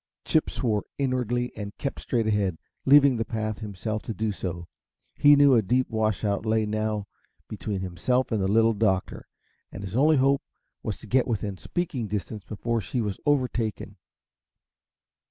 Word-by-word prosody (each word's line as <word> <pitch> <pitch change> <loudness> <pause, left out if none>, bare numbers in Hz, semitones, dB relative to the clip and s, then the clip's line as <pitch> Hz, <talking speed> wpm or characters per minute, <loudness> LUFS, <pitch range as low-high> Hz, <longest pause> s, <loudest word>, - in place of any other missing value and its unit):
Chip 155 - +2
swore 110 -5 -1
inwardly 125 -2 0
and 100 -1 -7
kept 140 - -4
straight 115 -3 -1
ahead, 100 -5 +1 0.3
leaving 140 -2 +6
the 115 - 0
path 110 -2 -3
himself 110 +1 -4
to 115 - -6
do 110 -1 -1
so. 90 -3 -5 0.5
He 145 0 +6
knew 140 -1 +6
a 115 - +5
deep 125 +6 0
washout 110 -2 0
lay 110 0 +1
now 110 -1 -1 0.4
between 100 0 -4
himself 125 +9 0
and 110 -3 +1
the 95 - +1
Little 115 +3 +4
Doctor, 100 -3 -1 0.4
and 100 - -8
his 95 +1 -6
only 150 +4 +4
hope 135 +1 +3 0.4
was - - -3
to - - -10
get 130 0 +2
within 105 -4 -2
speaking 135 - -3
distance 105 +1 -4
before 115 +3 -2
she 115 +6 -3
was 105 -4 -2
overtaken. 120 -7 0
110 Hz, 160 wpm, -26 LUFS, 105-125 Hz, 0.5 s, leaving